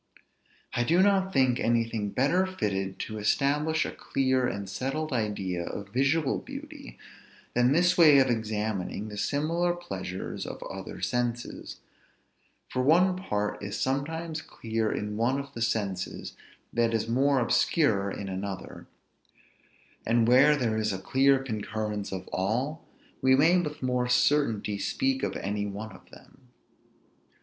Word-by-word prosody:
I 120 - +1
do 170 +9 +4
not 195 -1 +3
think 130 -7 +3
anything 115 -3 0
better 165 - +2
fitted 95 - -2
to 110 -1 -5
establish 150 +8 +1
a - - -4
clear 130 -2 0
and 100 -3 -4
settled 135 +10 -3
idea 100 -6 -1
of 100 +3 -6
visual 135 +5 +1
beauty 280 +1 -10 0.6
than 125 +1 +3
this 180 +4 +3
way 155 -4 +8
of 135 - +6
examining 110 -3 -2
the 105 - -8
similar 165 +7 0
pleasures 175 - -5
of - - -7
other - - -7
senses; 120 -1 -3 0.9
for 130 - -2
one 175 +7 +4
part 105 - -2
is 100 +2 -4
sometimes 155 +4 -2
clear 110 -5 -2
in 105 0 -3
one 125 +5 +1
of 140 0 -8
the 115 - -6
senses 105 -5 -2 0.4
that 115 -1 +2
is 115 - -1
more 135 +4 +3
obscure 115 - +2
in 100 0 -5
another; 95 0 -6 1.2
and 115 0 +2
where 135 +5 +6
there 115 -6 0
is 110 0 0
a 95 - -2
clear 135 +7 +3
concurrence 110 -4 -4
of 95 -1 -5
all, 125 - -2 0.3
we 130 0 +5
may 160 +6 +5
with 150 -4 -6
more 125 -1 0
certainty 125 -6 +2
speak 270 - 0
of - - -2
any 105 +1 -2
one 105 +2 -6
of 95 - -16
them. 130 -2 -18
125 Hz, 140 wpm, -28 LUFS, 105-150 Hz, 1.2 s, way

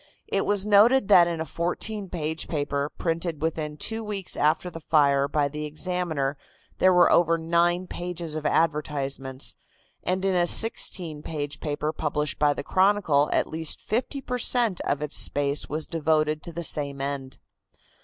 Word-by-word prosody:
It 195 - -1
was 205 -1 +3
noted 210 +3 +5
that 175 -4 +7
in 170 -1 -3
a 160 - -2
fourteen 185 +5 -3
page 160 -2 -3
paper 145 -2 -2
printed 165 -1 -3
within 155 -1 -3
two 225 +7 -1
weeks 205 -3 -4
after 155 +4 +1
the 165 - -8
fire 140 -3 +2
by 145 0 0
the 150 +2 -5
Examiner 155 -3 -2 0.4
there 185 - +5
were 180 -1 +5
over 165 -1 +4
nine 170 +2 +1
pages 175 -3 -5
of 155 - -4
advertisements, 140 -4 -1 0.5
and 185 +1 -1
in 195 - +2
a 175 -1 +2
sixteen 175 -7 +2
page 145 -2 -5
paper 150 0 -3
published 150 -1 -2
by 150 -1 +4
the - - -5
Chronicle 185 -6 +2
at - - +2
least 160 -1 -2
fifty 260 +5 -3
per 250 -1 -4
cent. 230 -6 +1
of 145 +1 -1
its 150 - -2
space 145 0 +1
was 155 +1 -2
devoted 155 -1 0
to 170 - -8
the 170 +1 -5
same 140 -3 +1
end. 135 -1 -4
160 Hz, 165 wpm, -25 LUFS, 150-180 Hz, 0.5 s, that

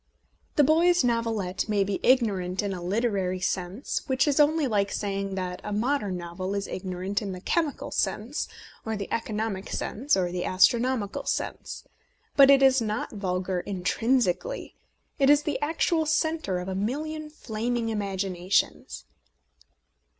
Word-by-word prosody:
The 295 - +5
boy's 340 +4 +4
novelette 225 -5 -1
may 205 -2 +3
be 195 0 -2
ignorant 200 -7 +2
in 200 -1 -2
a 180 - -6
literary 190 -1 0
sense, 185 +5 -2
which 265 +1 +2
is 290 0 +2
only 305 +1 +4
like 205 -5 +1
saying 195 -1 -2
that 180 -1 -4
a 210 - -5
modern 210 -3 0
novel 180 +3 -4
is 200 -1 -2
ignorant 185 +2 -3
in 200 -3 -4
the 180 - -7
chemical 310 - -1
sense, - - -1 0.4
or 220 0 -2
the 200 - -4
eco 230 -1 -4
nomic 210 -3 -3
sense, 260 +2 0
or 180 -2 0
the 180 0 -2
astronomical 230 +2 +2
sense; - - -3 0.5
but 275 -1 +8
it 275 -1 +7
is 265 -1 +5
not 215 0 -2
vulgar 185 -2 -2
intrinsically 225 - 0 0.2
— - - -43
it 275 0 +4
is 290 0 +6
the 290 -3 -2
actual 320 +1 +1
centre 315 - 0
of 180 +1 -5
a 190 - -2
million 300 +10 -3
flaming 235 -4 -3
imaginations. 195 -3 -1
210 Hz, 150 wpm, -27 LUFS, 190-265 Hz, 0.5 s, but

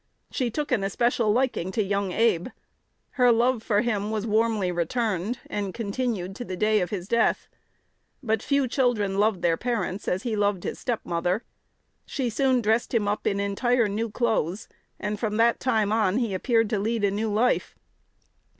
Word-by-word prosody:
She 250 -2 -1
took 295 +5 -3
an 225 -6 +2
especial 230 +2 +1
liking 240 -6 0
to 215 - +1
young 200 -1 -1
Abe. 200 -4 +2 0.6
Her 250 -3 +4
love 235 +1 +2
for 210 -2 +1
him 210 -4 -1
was 215 -1 -2
warmly 215 -3 +1
returned, 195 +4 -1
and 200 -2 -4
continued 210 -4 -3
to - - -5
the 185 -6 -6
day 215 +1 +2
of 180 - -1
his 185 -3 -5
death. 235 +1 +1 0.8
But 220 -3 0
few 280 -2 +1
children 225 -7 +1
loved 210 -3 +1
their 165 -1 +3
parents 210 -5 -2
as 185 +2 -1
he 230 -3 -1
loved 205 -3 0
his - - -4
step 240 -4 -2
mother. 175 +5 -1 0.6
She 250 -4 -2
soon 255 +1 +2
dressed 225 +3 +1
him 210 -3 +2
up 210 +1 -1
in 200 - 0
entire 230 +4 +1
new 220 +3 -2
clothes, 220 -5 -1 0.3
and 210 0 -3
from 215 -1 -1
that 230 +1 +3
time 220 -5 +1
on 215 -2 +2
he 235 -5 0
appeared 225 +3 +2
to 215 - +1
lead 225 +1 -1
a 200 - +3
new 215 +2 -1
life. 225 +4 +1
215 Hz, 180 wpm, -25 LUFS, 200-235 Hz, 0.8 s, Her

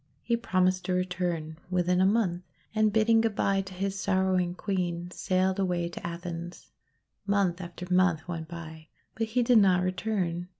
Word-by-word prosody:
He 235 - +1
promised 185 -5 +1
to 185 - 0
return 175 -3 -2
within 180 0 +2
a 190 - +5
month, 195 -5 +1 0.3
and, 215 -1 +3
bidding 225 +1 +4
good 225 -2 0
bye 195 0 +2
to 190 -1 -9
his 195 +1 -2
sorrowing 185 -2 +1
Queen, 175 -3 -2
sailed 185 +1 0
away 175 -3 0
to 170 - -9
Athens. 170 0 -7 0.6
Month 195 -3 +1
after 175 0 -7
month 180 -3 +2
went 165 -2 -5
by, 160 -1 -9 0.3
but 225 0 -2
he 240 +3 +1
did 240 -1 +6
not 185 -3 +4
return. 180 -2 -1
185 Hz, 165 wpm, -28 LUFS, 175-195 Hz, 0.6 s, did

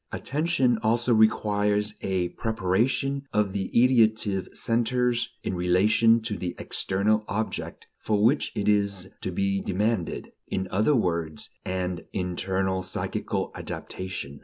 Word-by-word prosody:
Attention 135 -5 +1
also 120 +2 +2
requires 105 -1 +2
a 90 -2 -1
preparation 115 +6 0
of 105 -2 +2
the 95 -2 -2
ideative 110 -5 +3
centers 120 +1 +1
in - - -2
relation 100 +6 +4
to 110 -2 -4
the 90 -1 -3
external 105 +3 +1
object 110 +2 -3
for 105 -1 0
which 135 +6 +3
it 100 - -1
is 100 -2 +1
to - - -3
be 100 +2 0
demanded: 100 -1 -1 0.2
in 95 0 -2
other 110 +10 +3
words, 85 - -1
an 90 -1 -2
internal, 95 +1 -1
psychical 95 - -3
"adaptation." 80 -7 -6
105 Hz, 120 wpm, -26 LUFS, 95-115 Hz, 0.2 s, relation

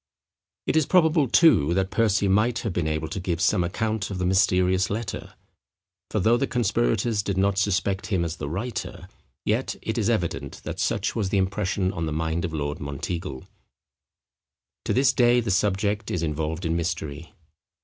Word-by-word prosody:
It - - 0
is 160 -2 +3
probable, 160 -5 +4
too, 95 - +5
that 95 0 0
Percy 105 -3 +2
might 110 +5 +2
have 110 -6 -3
been 85 -3 -1
able 80 0 -2
to 95 - -4
give 85 -2 -2
some 90 0 +2
account 110 +3 -2
of 100 - -4
the 90 - -1
mysterious 95 0 +2
letter. 110 +3 -5 0.7
For 110 - -1
though 115 +5 +4
the 135 - 0
conspirators 115 -1 +1
did 100 -1 -3
not 100 0 +2
suspect 100 -1 0
him 95 -5 0
as 85 +1 -4
the 70 - -4
writer, 105 +9 -5 0.4
yet - - 0
it 110 +1 -2
is 110 0 +1
evident 90 -8 -2
that - - -6
such - - 0
was 105 -4 -1
the 100 - +1
impression 95 0 0
on 80 0 -3
the 75 - -2
mind 80 +2 -1
of 85 - -4
Lord 75 -2 -3
Monteagle. 70 +1 -5 1.4
To - - -1
this 130 0 +3
day 120 0 +4
the 115 -4 -1
subject 100 +2 0
is 85 - -2
involved 80 +2 -2
in 80 0 0
mystery. 80 0 -4
95 Hz, 180 wpm, -25 LUFS, 85-110 Hz, 1.4 s, too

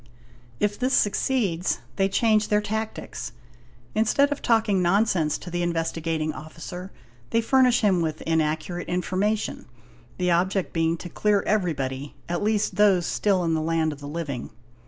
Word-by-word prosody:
If 205 0 0
this 255 +2 +2
succeeds, 205 -5 +1 0.2
they, 195 -1 +2
change 215 +1 +3
their 210 - +3
tactics; 215 - -4 0.6
instead 275 +6 +3
of 290 - -2
talking 220 -5 +2
nonsense 175 -4 +2
to 175 - -9
the 175 0 -1
Investigating 165 -2 -1
Officer, 175 +4 -8 0.4
they 230 - +2
furnish 250 +1 +4
him 190 -5 +3
with 155 -2 -2
inaccurate 160 +2 -1
information, 185 +4 -1 0.5
the 180 -1 +1
object 185 +2 +1
being 165 0 +1
to 175 - -8
clear 205 +3 +1
everybody, 145 -9 -1
at 175 +2 -2
least 210 -2 0
those 195 -4 +4
still 195 0 +1
in 165 -1 +1
the 160 - +1
land 160 -1 0
of 145 - -12
the 145 - -8
living. 145 -5 -4
180 Hz, 150 wpm, -25 LUFS, 165-210 Hz, 0.6 s, furnish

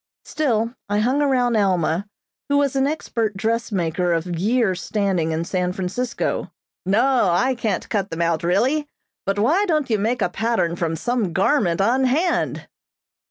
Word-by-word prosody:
Still 235 -6 0 0.2
I 205 - +1
hung 255 +7 +2
around 250 -4 +2
Alma, 190 -2 +1 0.4
who 285 - +3
was 280 -2 +1
an 270 0 +2
expert 230 -8 -2
dressmaker 190 -6 0
of 165 0 -1
years' 200 0 +1
standing 190 -6 0
in 160 +1 -2
San 180 0 -1
Francisco. 195 +7 -3 0.4
"No, 235 +1 +3
I 255 +10 +2
can't 225 -6 -2
cut 200 -3 -1
them 165 +1 -2
out, 165 -2 0
really; 255 - +1 0.4
but 195 +1 0
why 300 - +3
don't 305 -7 0
you 215 - +2
make 225 +2 0
a - - +2
pattern 205 -4 0
from 165 -2 -2
some 225 -2 -1
garment 190 - +2
on 250 +6 +2
hand?" 320 +8 0
215 Hz, 160 wpm, -22 LUFS, 180-255 Hz, 0.4 s, who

